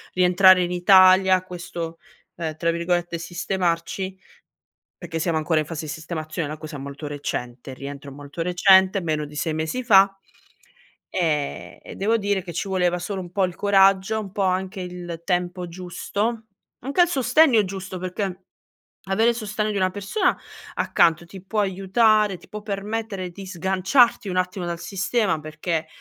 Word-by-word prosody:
rientrare 180 0 +6
in 175 - -3
Italia, 185 +1 +6
questo, 170 -2 -7 0.4
ehm, 160 -2 -4
tra 170 +1 +1
virgolette, 170 0 -1
"sistemarci", 180 +1 -2 0.8
perché 170 -2 -6
siamo 160 0 0
ancora 155 0 +1
in - - -5
fase 160 0 -6
di 150 - -5
sistemazione, 160 -1 -5
è - - -5
una 155 - -7
cosa 155 -1 -7
molto 140 +2 -7
recente, 130 -3 -5
rientro 140 +1 -8
molto 145 +3 -8
recente, 190 +2 +4
meno 155 -3 -2
di 150 0 -10
6 160 +1 -1
mesi 160 +10 -2
fa, 195 -5 +5 1.0
ehm, 150 -5 -2
e - - -10
devo 220 +4 +1
dire 200 -3 -1
che 175 - -7
ci 175 - -3
voleva 180 -2 +1
solo 190 +1 -4
un 175 - -10
po' 195 +1 +2
il 180 -2 -6
coraggio, 195 +1 +3
un 200 -3 -7
po' 205 - -1
anche 185 0 -1
il 175 -2 -7
tempo 180 -1 -1
giusto, 205 +6 -3 0.3
anche 275 +8 -4
al 350 - +5
sostegno 265 -4 +4
giusto 190 -1 -6
perché 185 0 -4 0.6
avere 220 +5 +3
il 235 - -5
sostegno 215 -1 -2
di - - -4
una 185 -1 +2
persona 205 - 0 0.4
accanto 170 0 +2
ti 185 +1 -12
può 210 +2 -2
aiutare, 200 +1 +2
ti - - -19
può 210 0 -7
permettere 205 -2 -4
di 195 +3 -10
sganciarti 190 - +2
un 185 - -2
attimo 185 0 -1
dal 170 -1 -4
sistema, 200 -1 -1
perché 155 +1 -3
185 Hz, 165 wpm, -23 LUFS, 170-200 Hz, 1.0 s, rientrare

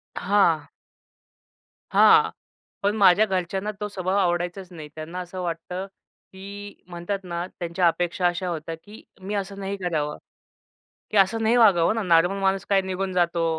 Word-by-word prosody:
हां. 170 -7 +2 1.3
हां. - - +6 0.5
पण 205 +2 +1
माझ्या 200 +1 +6
घरच्यांना 190 +2 -2
तो 210 - -3
स्वभाव 190 0 -2
आवडायचाच 175 0 -1
नाही. 155 -3 -9
त्यांना 160 +3 -6
असं 180 +1 -6
वाटतं, 180 +2 -4 0.5
की 200 +1 -10
म्हणतात 175 +3 -4
ना, 175 0 -4
त्यांच्या 175 +1 +1
अपेक्षा 175 +1 0
अशा 175 +1 -2
होत्या, 165 -1 -4
की 205 +6 -15 0.2
मी 200 +2 -5
असं 200 0 -4
नाही 195 +1 -4
करावं. 155 -5 -2 0.9
की 215 - +1
असं 215 +4 +3
नाही 225 +2 +3
वागावं 200 -3 +5
ना. 225 - -1
नॉर्मल 175 +2 +3
माणूस 195 0 0
काय 195 -1 +4
निघून 190 0 -3
जातो. 170 -1 +1
185 Hz, 150 wpm, -24 LUFS, 175-200 Hz, 1.3 s, हां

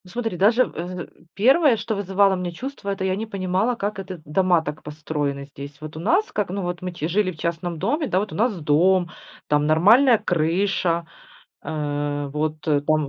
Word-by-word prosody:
Ну 180 - -16
смотри, 225 -2 -3
даже 225 +7 +4
в, - - -13
э, 175 +1 -5 0.3
первое, 265 - +4
что 220 +1 -3
вызывало 195 0 +2
у - - +1
меня 180 -1 -3
чувство, 255 +2 -6
это 195 -1 -2
я 185 0 +1
не 220 +3 -4
понимала, 195 +3 0
как 205 -2 -3
это 185 -2 -7
дома 175 +2 +2
так 150 0 -6
построены 150 -2 -4
здесь. 140 0 -10
Вот 155 0 -9
у - - -6
нас 350 - +1
как, 205 -3 -1
ну, 195 +1 -3
вот 175 0 -4
мы 180 0 -4
чи 170 -3 -4
жили 185 +2 +1
в 165 - -13
частном 170 +1 -3
доме, 295 - 0
да, 185 - +1
вот 210 - -3
у - - -6
нас 215 -2 +1
дом, 170 +4 +3 0.4
там 150 0 +2
нормальная 225 - +6
крыша, 170 0 0 0.6
э, 145 -1 -2
вот 155 +1 -1
там 150 0 +1
180 Hz, 200 wpm, -23 LUFS, 155-205 Hz, 0.6 s, нормальная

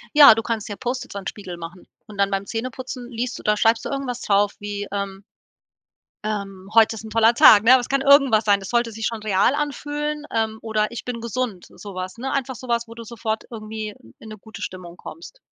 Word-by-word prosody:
Ja, 285 -6 +10
du 225 - -2
kannst 225 -2 -3
dir 205 - -5
Post-its 250 -1 -4
an 200 - -5
'n - - -7
Spiegel 185 -4 -6
machen. 170 +2 -10 0.2
Und 210 -2 -12
dann 200 0 +2
beim 195 0 -1
Zähneputzen 245 +2 -5
liest 245 +1 -4
du - - -12
da 210 - +2
schreibst 225 +2 +2
du - - -3
irgendwas 270 -3 -3
drauf 205 0 +2
wie, 205 0 -4
ähm 200 -1 -4 1.0
ähm, 195 -3 -5
„heute 225 0 +6
ist 220 - -8
'n 220 - -8
toller 225 +1 +4
Tag, 215 -3 +8
ne?“ 255 +3 +8
Es 245 - -6
kann 275 0 +1
irgendwas 275 -6 +5
sein, 200 -1 +4
das 195 - -8
sollte 235 -1 +1
sich 220 0 -5
schon 230 -2 -5
real 210 +5 +2
anfühlen, 295 +1 -3
ähm, 220 -1 -1
oder 215 -1 -1
„ich 235 - -6
bin 245 -2 -5
gesund“, 230 -4 -3
so 200 -2 -11
was, 185 +3 -5
ne? 265 +3 -4
Einfach 265 -1 -2
so 255 +3 -10
was, 235 -1 0
wo 230 - -10
du 230 - -8
sofort 220 -1 -4
irgendwie 215 -2 -6 0.2
in 220 - -11
'ne 215 - -9
gute 220 +2 -12
Stimmung 180 -2 -7
kommst. 345 +9 -11
225 Hz, 230 wpm, -22 LUFS, 205-245 Hz, 1.0 s, Ja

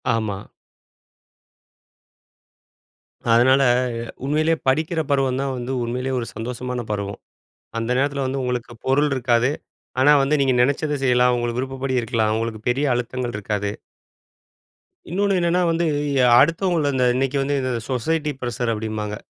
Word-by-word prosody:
ஆமா. 105 -3 -3 2.9
அதனால, 130 +4 +5 0.6
உண்மையிலே 155 +3 +2
படிக்கிற 155 +5 +1
பருவம் 135 -2 +1
தான் 135 -1 -2
வந்து 125 +1 -4
உண்மையிலே 125 +3 -3
ஒரு 120 - -3
சந்தோஷமான 125 +2 -4
பருவம். 100 -1 -4 0.6
அந்த 115 +1 -2
நேரத்தில 140 0 0
வந்து 135 +1 -2
உங்களுக்கு 125 -1 -3
பொருள் 140 +3 +3
இருக்காது. 120 0 +2 0.5
ஆனா 140 +3 +6
வந்து 135 +2 +1
நீங்க 135 -2 +3
நெனைச்சத 145 +3 0
செய்யலாம். 125 -1 +4
உங்களுக்கு 120 0 -2
விருப்பப்படி 135 0 -3
இருக்கலாம். 110 -2 0
உங்களுக்கு 110 -1 -3
பெரிய 130 +4 +1
அழுத்தங்கள் 120 0 -3
இருக்காது. 105 0 -2 1.4
இன்னொன்னு 195 +2 +1
என்னன்னா 175 +1 +2
வந்து 165 +1 +1 0.3
ய - - +3 0.2
அடுத்தவங்கள 165 +1 +1
அந்த 130 -1 +2
இன்னைக்கு 135 +2 0
வந்து 140 +1 0
இத, 130 - -2 0.2
சொசைட்டி 150 +5 0
ப்ரசர் 120 -1 -2
அப்படிம்பாங்க. 105 -1 -4
130 Hz, 125 wpm, -22 LUFS, 120-140 Hz, 2.9 s, ஆனா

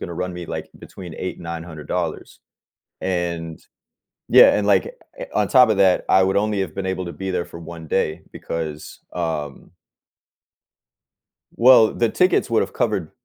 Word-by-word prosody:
gonna 85 - -6
run 90 0 -4
me, 90 -1 -6
like, - - -6
between 90 -4 -10
8 90 - -5
and - - -12
$900. 85 -2 -5 0.6
And 85 -3 -3 0.7
yeah, - - +7
and, 100 - -1
like, 100 -2 +4 0.3
eh - - -6
on 105 -2 +1
top 125 -3 +6
of 100 - +1
that, 95 -2 +3
I 95 - +5
would 95 +1 +1
only 105 -1 0
have 90 -5 -4
been 95 -1 -4
able 95 -1 -5
to 85 - -6
be 95 0 -5
there 90 -1 -1
for 85 - -11
1 80 -1 -9
day 80 -3 -1
because, 80 -2 -6
um 80 -5 -4 1.8
Well, 115 -2 +6
the 115 -2 +1
tickets 180 0 +2
would've - - 0
covered - - -1
90 Hz, 165 wpm, -21 LUFS, 85-100 Hz, 1.8 s, yeah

